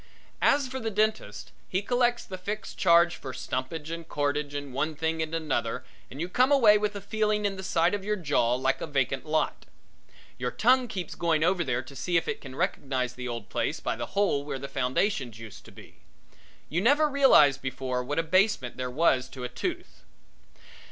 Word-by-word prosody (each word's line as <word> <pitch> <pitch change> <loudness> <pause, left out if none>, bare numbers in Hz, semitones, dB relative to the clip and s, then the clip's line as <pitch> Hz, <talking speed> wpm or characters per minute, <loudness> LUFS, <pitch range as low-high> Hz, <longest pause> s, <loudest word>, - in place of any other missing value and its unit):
As 280 -1 +3
for 260 +1 -5
the 225 -2 -2
dentist, 215 - -1 0.2
he 185 +2 -1
collects 245 +1 +1
the 185 -1 -7
fixed 210 +3 -5
charge 170 -1 +4
for 130 -2 -7
stumpage 130 +5 -4
and 165 -1 -6
corkage 145 0 -1
and 145 -2 -5
one 155 +4 -1
thing 160 +1 -1
and 160 +1 -2
another 135 -8 -2 0.3
and 135 - -10
you 170 - -2
come 255 +9 +2
away 235 -7 +6
with 210 0 -1
a 200 - -5
feeling 210 0 0
in 200 -1 0
the 190 - -7
side 175 -1 +1
of 205 -2 -2
your 210 +1 0
jaw 145 - +1
like 130 +1 0
a - - -3
vacant 135 -1 -1
lot. 155 0 -1 0.7
Your - - -1
tongue 255 +2 +3
keeps 185 -7 -5
going 160 -2 +1
over 180 +1 +2
there 130 -3 -1
to 135 +2 -13
see 170 +6 0
if 165 - -1
it - - -3
can 130 -2 -9
recognize 130 -3 -1
the 125 0 -6
old 115 -3 -6
place - - -1
by - - -2
the - - -5
hole 195 -9 +2
where 145 -2 -4
the 140 +1 -6
foundations 130 - -1
used 110 -2 -11
to - - -13
be. - - -15 0.7
You 170 +4 -1
never 285 +8 +4
realized 265 - +5
before 130 -1 -3
what 145 +4 -4
a 165 - +2
basement 185 - +1
there 130 0 -3
was 130 -2 +2
to 130 - -8
a 125 - -3
tooth. 125 - -5
160 Hz, 205 wpm, -27 LUFS, 130-205 Hz, 0.7 s, away